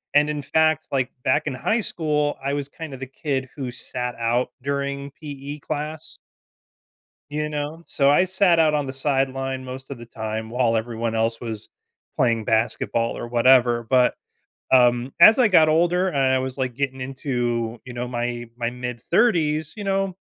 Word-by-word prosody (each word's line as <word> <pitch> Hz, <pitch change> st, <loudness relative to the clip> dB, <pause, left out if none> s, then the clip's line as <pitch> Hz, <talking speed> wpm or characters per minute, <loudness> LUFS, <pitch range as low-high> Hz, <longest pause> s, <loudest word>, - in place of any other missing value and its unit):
And 150 Hz, +1 st, +5 dB
in 150 Hz, -1 st, -2 dB
fact, 155 Hz, +2 st, +1 dB
like, 130 Hz, -2 st, 0 dB
back 130 Hz, -, +1 dB
in -, -, -1 dB
high 215 Hz, -, 0 dB
school, 150 Hz, -6 st, -1 dB
I 140 Hz, +1 st, -1 dB
was 145 Hz, -1 st, -2 dB
kind 155 Hz, 0 st, -9 dB
of 135 Hz, -, -8 dB
the 135 Hz, -, -5 dB
kid 135 Hz, 0 st, -3 dB
who 130 Hz, -4 st, -4 dB
sat 125 Hz, 0 st, -5 dB
out 120 Hz, +2 st, +1 dB
during 140 Hz, 0 st, -3 dB
PE 145 Hz, -1 st, -7 dB
class. 155 Hz, +1 st, -5 dB, 1.1 s
You 150 Hz, +1 st, -1 dB
know? 150 Hz, +2 st, -4 dB
So, 140 Hz, -1 st, +2 dB
I 150 Hz, +6 st, +5 dB
sat 185 Hz, -2 st, +3 dB
out 155 Hz, -2 st, +4 dB
on 145 Hz, -1 st, 0 dB
the 130 Hz, -, -5 dB
sideline 135 Hz, -1 st, -1 dB
most 130 Hz, +1 st, -8 dB
of 140 Hz, -, -6 dB
the 120 Hz, -, -10 dB
time 110 Hz, -1 st, -5 dB
while 120 Hz, -1 st, +1 dB
everyone 115 Hz, 0 st, -2 dB
else 115 Hz, 0 st, 0 dB
was 110 Hz, -3 st, -6 dB, 0.5 s
playing 115 Hz, -3 st, +2 dB
basketball 115 Hz, +1 st, 0 dB
or -, -, -5 dB
whatever. 120 Hz, 0 st, +4 dB
But, 125 Hz, -1 st, +4 dB, 0.6 s
um, 125 Hz, 0 st, +4 dB
as 215 Hz, +6 st, +9 dB
I 245 Hz, -4 st, +4 dB
got 160 Hz, -5 st, +6 dB
older 175 Hz, +4 st, +2 dB
and 165 Hz, -6 st, -2 dB
I 130 Hz, -1 st, +3 dB
was, 130 Hz, 0 st, -4 dB
like, 130 Hz, -2 st, -2 dB
getting 135 Hz, 0 st, -3 dB
into, 120 Hz, -3 st, -2 dB
you 125 Hz, -, -8 dB
know, 120 Hz, 0 st, -4 dB
my 120 Hz, -1 st, -3 dB
my 120 Hz, -1 st, -2 dB
mid-thirties, 150 Hz, -, 0 dB
you 210 Hz, -, -6 dB
know, 195 Hz, -1 st, 0 dB
135 Hz, 175 wpm, -23 LUFS, 120-150 Hz, 1.1 s, as